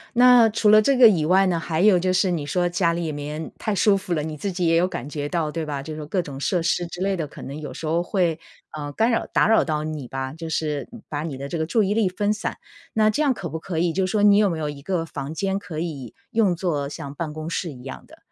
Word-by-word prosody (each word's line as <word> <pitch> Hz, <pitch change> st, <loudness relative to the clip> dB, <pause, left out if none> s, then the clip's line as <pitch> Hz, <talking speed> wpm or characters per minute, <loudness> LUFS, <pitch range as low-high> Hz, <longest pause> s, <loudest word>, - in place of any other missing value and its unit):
那 245 Hz, -2 st, +7 dB
除 215 Hz, 0 st, 0 dB
了 215 Hz, 0 st, +8 dB
这 270 Hz, +3 st, +2 dB
个 245 Hz, -3 st, +9 dB
以 165 Hz, -8 st, +3 dB
外 190 Hz, +3 st, +4 dB
呢， 175 Hz, -2 st, +1 dB
还 165 Hz, -1 st, -2 dB
有 195 Hz, -1 st, +6 dB
就 185 Hz, +1 st, +1 dB
是 185 Hz, +1 st, +2 dB
你 160 Hz, -5 st, -1 dB
说 175 Hz, +3 st, 0 dB
家 175 Hz, -1 st, +1 dB
里 165 Hz, -2 st, -2 dB
面 150 Hz, +2 st, -5 dB
太 215 Hz, -, -2 dB
舒 200 Hz, +1 st, +4 dB
服 185 Hz, -2 st, -3 dB
了， 155 Hz, -, 0 dB
你 155 Hz, 0 st, -5 dB
自 195 Hz, +6 st, -3 dB
己 175 Hz, -1 st, -1 dB
也 165 Hz, -, +3 dB
有 175 Hz, +2 st, +4 dB
感 145 Hz, -7 st, -5 dB
觉 145 Hz, -1 st, -4 dB
到 160 Hz, -2 st, -1 dB
对 160 Hz, 0 st, -3 dB
吧？ 145 Hz, -2 st, -4 dB
就 155 Hz, +2 st, -7 dB
说 155 Hz, -1 st, -6 dB
各 180 Hz, +4 st, 0 dB
种 140 Hz, -5 st, -8 dB
设 175 Hz, +5 st, 0 dB
施 170 Hz, +1 st, 0 dB
之 175 Hz, -, -9 dB
类 195 Hz, 0 st, 0 dB
的， 160 Hz, -4 st, -2 dB
可 -, -, -12 dB
能 140 Hz, +2 st, -7 dB
有 155 Hz, -, -7 dB
时 160 Hz, -, -7 dB
候 170 Hz, +2 st, +1 dB
会， 175 Hz, -4 st, 0 dB, 0.4 s
呃， 145 Hz, -1 st, -5 dB
干 225 Hz, +9 st, +1 dB
扰 230 Hz, -, +1 dB
打 -, -, +2 dB
扰 225 Hz, -, +5 dB
到 155 Hz, -1 st, -2 dB
你 150 Hz, -6 st, -5 dB
吧， 135 Hz, +1 st, -4 dB
就 165 Hz, 0 st, -7 dB
是 150 Hz, +2 st, -2 dB, 0.2 s
把 150 Hz, 0 st, -4 dB
你 145 Hz, -5 st, -5 dB
的 140 Hz, +1 st, -5 dB
这 170 Hz, -, -4 dB
个 160 Hz, -, -1 dB
注 220 Hz, +7 st, +2 dB
意 200 Hz, +2 st, +1 dB
力 215 Hz, -4 st, +2 dB
分 205 Hz, +3 st, 0 dB
散。 210 Hz, -, -4 dB, 0.4 s
那 215 Hz, -1 st, +4 dB
这 295 Hz, +8 st, +1 dB
样 275 Hz, -3 st, +3 dB
可 185 Hz, -7 st, -6 dB
不 160 Hz, -, -5 dB
可 165 Hz, -1 st, -4 dB
以， 170 Hz, -1 st, +1 dB
就 190 Hz, 0 st, +1 dB
说 205 Hz, +2 st, 0 dB
你 205 Hz, -1 st, +7 dB
有 210 Hz, -2 st, +4 dB
没 165 Hz, -2 st, -3 dB
有 150 Hz, -1 st, -2 dB
一 140 Hz, -1 st, -8 dB
个 165 Hz, +1 st, -2 dB
房 145 Hz, -1 st, -6 dB
间 195 Hz, +2 st, -1 dB
可 175 Hz, -5 st, -6 dB
以 150 Hz, -7 st, -5 dB, 0.2 s
用 220 Hz, -6 st, +3 dB
作 155 Hz, -6 st, -2 dB
像 140 Hz, -1 st, -7 dB
办 160 Hz, -1 st, -4 dB
公 155 Hz, +1 st, -6 dB
室 170 Hz, -1 st, -3 dB
一 125 Hz, -2 st, -12 dB
样 135 Hz, -, -8 dB
的， -, -, -17 dB
170 Hz, 310 characters per minute, -23 LUFS, 150-195 Hz, 0.4 s, 个